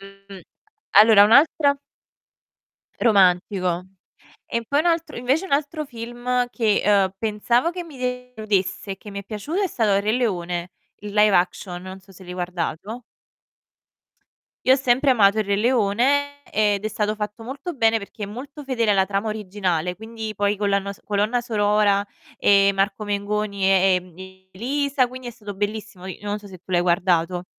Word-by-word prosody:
Mhmm, 195 0 -13 0.5
allora 210 0 +8
un 210 - +3
altra 285 +1 +5 1.2
Romantico. 185 -3 +2 0.6
E 235 - -3
poi 285 - +2
un 315 - 0
altro 330 -1 0
invece 270 +9 0
un - - -11
altro 305 +2 -1
film 245 0 -3
che, 220 -4 +1
ehm, 195 -2 +3
pensavo 235 +7 0
che 355 0 -6
mi 315 -5 -13
deludesse 220 -7 -2
e 195 - -6
che 210 - -12
mi 200 - -5
è 200 - -9
piaciuto 230 - -4
è 390 - +1
stato 215 - +1
Il 200 - +2
Re 210 - +1
Leone, 180 -7 -2 0.3
il 205 -1 -7
live 210 -1 +4
action, 180 0 -1
non 185 +1 -9
so 190 +1 -20
se 190 0 -14
l'hai 180 - -8
guardato. 180 +5 -4 1.6
Io 260 - +7
ho - - +5
sempre 265 +1 +2
amato 215 -4 +4
Il 215 - 0
Re 200 - +1
Leone 255 +6 +1
ed 210 -1 +1
è - - +2
stato 215 0 -2
fatto 210 +1 -5
molto 280 +9 -6
bene, 225 -3 +3
perché 205 0 -8
è - - -1
molto 275 +7 -9
fedele 235 -5 0
alla 190 -1 +2
trama 200 +2 -1
originale, 185 -5 -2
quindi 220 0 -7
poi 205 +1 +1
con 205 0 -1
la 200 - +3
nos 200 0 -5
colonna 210 +4 0
sonora, 205 -3 +2 0.3
ehm, 200 -1 +4
Marco 195 +2 0
Mengoni 205 -1 -2
e, 190 -1 +4
ehm, 180 -1 -5 0.4
Elisa, 270 +4 0
quindi 255 +1 -10
è - - -5
stato 210 -3 -9
bellissimo. 205 -2 -4
I 190 - -7
non 205 0 -3
so 210 - -14
se 185 -2 -11
tu 185 - -13
l'hai 175 -1 +3
guardato. 175 0 +1
210 Hz, 175 wpm, -22 LUFS, 195-245 Hz, 1.6 s, allora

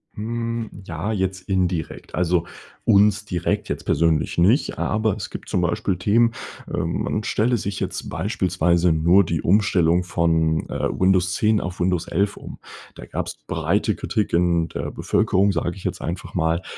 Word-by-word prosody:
Mhm, 115 +1 -3 0.2
ja 85 +6 -3
jetzt 95 -2 -1
indirekt. 90 -4 -2
Also, 90 -1 +1 0.4
uns 105 +1 +4
direkt 90 -4 -2
jetzt - - -3
persönlich 80 0 +1
nicht 105 - +3
aber 110 -2 0
es 105 - -6
gibt - - -8
zum 90 - +1
Beispiel 90 +2 0
Themen, 115 +6 +3 0.4
ähm, 80 +1 -1
man 105 - -2
stelle 120 +3 +1
sich 100 -2 -3
jetzt - - -4
beispielsweise 90 -4 +1
nur 85 +5 +4
die 80 -3 -2
Umstellung 90 -3 +3
von, 80 -2 +1
äh, - - -2
Windows 95 -1 +2
10 110 -1 +2
auf 90 0 -5
Windows 90 -1 0
11 100 +4 0
um. - - -9 0.4
Da - - -10
gab's - - -4
breite - - 0
Kritik 105 -2 -2
in 85 -1 +2
der - - -4
Bevölkerung, 100 +2 +2
sage 85 -2 -2
ich 95 - -11
jetzt - - -3
einfach 85 +3 -5
mal, 85 +1 0
90 Hz, 160 wpm, -22 LUFS, 85-105 Hz, 0.4 s, uns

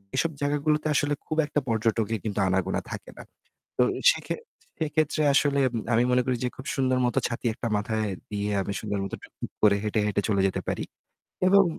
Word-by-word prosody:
এসব 165 - +1
জায়গাগুলোতে 150 +2 +1
আসলে 145 0 +2
খুব 155 - -3
একটা 150 0 0
পর্যটকের 110 -1 +1
কিন্তু 105 -2 -2
আনাগোনা 95 0 0
থাকে - - -7
না। - - -8 0.5
তো - - +5 0.3
সেক্ষে - - -3 0.4
সেক্ষেত্রে 155 -1 +1
আসলে 140 0 +3 0.3
আমি 120 +2 +4
মনে 125 0 +4
করি 130 - +1
যে 125 - +1
খুব 130 - -9
সুন্দর 130 -2 +2
মতো 125 +2 +2
ছাতি 120 0 -5
একটা 115 - -4
মাথায় 110 0 -1 0.2
দিয়ে। 105 0 -1
আমি 100 +1 -3
সুন্দর 100 -2 -2
মতো 95 - -4
টুকটুক - - -8
করে 105 -1 +6
হেঁটে, 110 +1 0
হেঁটে 100 -1 +1
চলে 100 -2 +3
যেতে 95 - -2
পারি। - - -1 0.7
এবং 200 +1 +7
120 Hz, 185 wpm, -26 LUFS, 105-145 Hz, 0.7 s, এবং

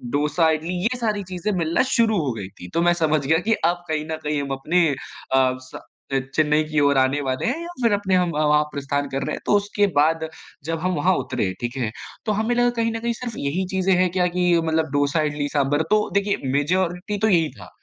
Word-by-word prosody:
डोसा, 150 +3 +2
इडली 160 +3 -2
ये 245 +4 0
सारी 210 -4 -1
चीज़े 185 +3 -3
मिलना 165 -1 +1
शुरू 220 -3 +3
हो 130 - 0
गई 100 - -5
थी। 90 - -9
तो 170 - +3
मैं 175 0 +4
समझ 155 -2 +2
गया 160 +3 +3
कि 225 - +4
अब 175 +1 0
कहीं 155 -1 -1
न 160 - -2
कहीं 150 -1 -1
हम 140 -1 -5
अपने 165 +5 +2
अ, 130 -1 -1
स 130 - -14 0.4
अ, 135 - +3 0.2
चेन्नई 155 0 +3
की 155 - +2
ओर 140 -1 +3
आने 135 +2 +2
वाले 130 0 -1
हैं 275 +8 -1
या 340 - -6 0.2
फिर 230 -3 +4
अपने 195 -2 +1
हम 180 -1 +2
वहाँ 150 0 +3
प्रस्थान 140 0 -2
कर 135 +1 -2
रहे - - -2
हैं। - - -9
तो - - +3
उसके 205 0 +1
बाद 160 +2 +2 0.4
जब 165 0 -2
हम 185 +2 -1
वहाँ 180 +5 +2
उतरे, 95 - -2
ठीक 120 +2 -3
है। 120 -4 -1 0.3
तो 215 - +1
हमें 235 +2 0
लगा 245 0 +3
कि 240 - -6
कहीं 230 - +1
न 225 - -3
कहीं 235 +1 -1
सिर्फ 235 0 -6
यही 170 +7 -1
चीज़ें 190 0 +2
हैं 185 0 +3
क्या? 180 0 +2
कि 180 0 +1
मतलब 160 -1 0
डोसा, 145 +2 +2
इडली, 145 0 -2
साँभर, 145 +1 +2
तो 215 0 +3
देखिए 200 0 +1 0.2
मेजॉरिटी 180 +6 0
तो 220 +2 +2
यही 165 -4 +3
था। - - -11
165 Hz, 240 wpm, -22 LUFS, 145-190 Hz, 0.4 s, मैं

